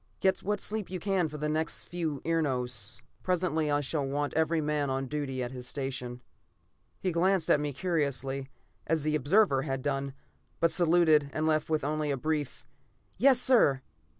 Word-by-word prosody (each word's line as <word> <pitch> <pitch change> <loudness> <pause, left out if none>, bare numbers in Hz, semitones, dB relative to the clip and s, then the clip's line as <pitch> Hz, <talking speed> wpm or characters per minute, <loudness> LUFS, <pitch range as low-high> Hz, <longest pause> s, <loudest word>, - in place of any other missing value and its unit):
"Get 190 0 +2
what 210 +2 -2
sleep 215 -2 -3
you 185 0 -4
can 190 -2 +1
the 150 0 -4
next 155 +1 -2
few 160 -5 -3
enaros. 125 -9 -1 0.2
Presently 170 -4 0
I 145 0 +2
shall 145 +1 -2
want 145 +2 -2
every 160 +1 +2
man 150 -2 0
on 135 0 -1
duty 135 -2 -3
and 120 - -4
at - - -9
his 125 0 -5
station." 125 -3 -4 0.8
He 185 - -1
glanced 180 0 +2
at - - +5
me 145 0 -2
curiously, 140 -4 -2 0.4
as 160 -2 +1
the 155 0 0
observer 150 0 +3
had 135 -2 -3
done, 140 -1 -2 0.4
but 165 0 +3
saluted 160 -4 +4
and 155 - -1
left 155 -1 +1
with 155 -2 0
only 150 +1 -1
a 140 - 0
brief, 150 0 -3 0.5
"Yes, 260 +1 +6
sir!" 220 - +4
150 Hz, 175 wpm, -29 LUFS, 135-165 Hz, 0.8 s, Yes